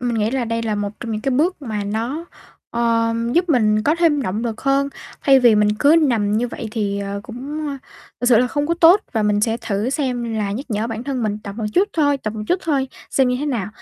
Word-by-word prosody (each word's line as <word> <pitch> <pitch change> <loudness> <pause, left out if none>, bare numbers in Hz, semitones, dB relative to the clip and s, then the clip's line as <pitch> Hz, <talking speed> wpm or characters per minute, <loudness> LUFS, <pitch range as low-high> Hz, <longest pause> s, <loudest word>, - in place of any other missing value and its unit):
mình 240 -1 -1
nghĩ 215 +1 +1
là 260 -1 -1
đây 230 0 -2
là 220 -2 -1
một 205 0 -3
trong 230 -2 -4
những 215 - -2
cái 270 - -1
bước 310 +6 +1
mà 215 -5 -3
nó, 235 +10 -3 0.5
ờ, 230 -1 +1 0.2
giúp 355 +4 +2
mình 215 -7 +3
có 295 +7 +2
thêm 315 -5 +3
động 215 +1 -2
lực 225 -2 -4
hơn, 275 +1 +1 0.3
thay 270 -2 +5
vì 240 -3 +6
mình 210 0 +3
cứ 300 +4 +5
nằm 210 -4 +1
như 240 +2 0
vậy 230 - -6
thì, 205 -3 -2
ờ, 200 0 -4
cũng, 275 +7 -6
ơ, 280 - -4 0.4
thật 245 - -1
sự 240 - +6
là 250 - +3
không 290 +3 -1
có 335 - +1
tốt 345 +3 +6
và 220 - 0
mình 210 0 +2
sẽ 225 +1 +1
thử 225 0 -2
xem 245 -5 -2
là 205 -2 -1
nhắc 260 +7 -5
nhở 215 +1 -1
bản 225 0 -5
thân 265 -3 -2
mình 210 -1 -1
tập 200 -1 -7
một 220 - -3
chút 400 +3 +3
thôi, 285 -3 +2
tập 215 -5 -4
một 215 - -4
chút 365 +1 +1
thôi, 275 -5 0 0.2
xem 265 -2 +3
như 250 - +1
thế 295 - -3
nào. 235 -9 -2
235 Hz, 260 wpm, -20 LUFS, 215-280 Hz, 0.5 s, vì